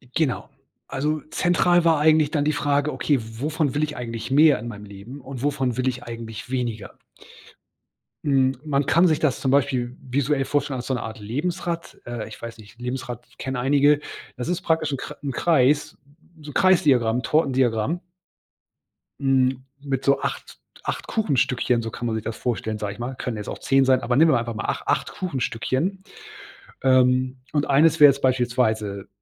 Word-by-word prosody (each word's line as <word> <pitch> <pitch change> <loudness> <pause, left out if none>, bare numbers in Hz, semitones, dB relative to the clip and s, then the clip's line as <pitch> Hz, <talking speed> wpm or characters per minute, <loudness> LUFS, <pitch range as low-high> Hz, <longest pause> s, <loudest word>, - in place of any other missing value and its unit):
Genau. 155 -6 0 0.4
Also 150 +3 -1
zentral 175 0 +3
war 165 -2 +4
eigentlich 155 -1 +4
dann 145 -1 0
die 155 - +2
Frage, 145 +1 +1
okay: 145 -3 +1
„Wovon 140 +6 -2
will 150 - +1
ich 150 -1 -3
eigentlich 115 0 -5
mehr 150 -2 +6
in 120 - -7
meinem 105 -3 -8
Leben 100 +7 -10
und 130 -1 -8
wovon 135 -4 0
will 130 0 0
ich 125 -1 -5
eigentlich 115 0 -8
weniger?“ 120 -5 -3 1.3
Hm, 135 -2 +2
man 140 -2 0
kann 170 +3 +5
sich 155 -3 +2
das 145 -5 +1
zum 130 - 0
Beispiel 125 -2 +1
visuell 135 +2 0
vorstellen 145 -1 -1
als 125 - -6
so 130 - 0
'ne 120 - -4
Art 110 0 -7
Lebensrad, 170 - -4
äh, 120 -2 -5
ich 110 - -11
weiß 115 0 -7
nicht, 110 +1 -16
Lebensrad 125 -1 -5
kennen 130 0 -4
einige. 145 +3 +3 0.4
Das 125 - -5
ist 180 +1 -1
praktisch 160 -4 0
'n - - -1
Kre - - -7
'n 140 - -2
Kreis 145 -1 +2 0.5
so 150 0 -8
Kreis-Diagramm, 135 - +3
Tortendiagramm. 135 0 +1 1.2
Hm, 130 -1 +2 0.2
mit 135 -2 -2
so 140 0 +3
8- - - -5 0.3
acht - - -4
Kuchenstückchen, 130 - +1
so 115 - -4
kann 120 - -6
man 115 - -1
sich 110 - -3
das 115 - -5
vorstellen, 110 -3 -2
sage 105 -2 -4
ich 100 - -16
mal. 125 +2 -4
Können 125 -3 -4
jetzt 105 - -6
auch - - -5
10 135 0 +3
sein, 130 -1 +3
aber 120 - 0
nehmen 160 +4 +6
wir 130 - +4
einfach 115 0 -4
mal 110 - -5
ach - - -2
acht - - 0
Kuchenstückchen. 150 - -2 0.8
Ähm, 130 0 +3
und 145 -1 0
eines 155 +3 +4
wäre 145 -1 +10
jetzt 140 +1 -6
beispielsweise 115 -6 0
130 Hz, 180 wpm, -23 LUFS, 120-150 Hz, 1.3 s, wäre